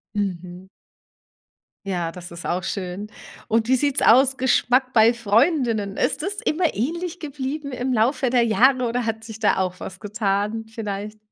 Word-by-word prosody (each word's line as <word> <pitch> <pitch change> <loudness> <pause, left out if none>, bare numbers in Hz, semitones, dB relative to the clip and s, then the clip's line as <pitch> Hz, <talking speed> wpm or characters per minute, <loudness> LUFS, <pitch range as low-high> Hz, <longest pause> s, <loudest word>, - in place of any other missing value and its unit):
Mhm. 185 -2 -4 1.2
Ja, 175 -4 -2
das 180 +1 -10
ist 170 0 -9
auch 180 +2 -1
schön, 190 +1 -4 0.4
und 225 +1 +1
wie 260 - +4
sieht's 280 +1 +1
aus, 265 +3 +5
Geschmack 255 0 +2
bei 230 +1 +5
Freundinnen? 230 - +1
Ist - - 0
es 400 +2 -3
immer 335 +2 +1
ähnlich 340 - -3
geblieben 285 -1 -5
im 255 +1 -2
Laufe 250 +3 +2
der 245 -1 +3
Jahre 255 +3 +3
oder 245 +1 -1
hat 225 0 -3
sich 220 -1 -9
da 215 - +2
auch 185 -1 -2
was 190 0 -8
getan 210 +1 -2
vielleicht? 210 -1 -6
225 Hz, 160 wpm, -23 LUFS, 200-260 Hz, 1.2 s, aus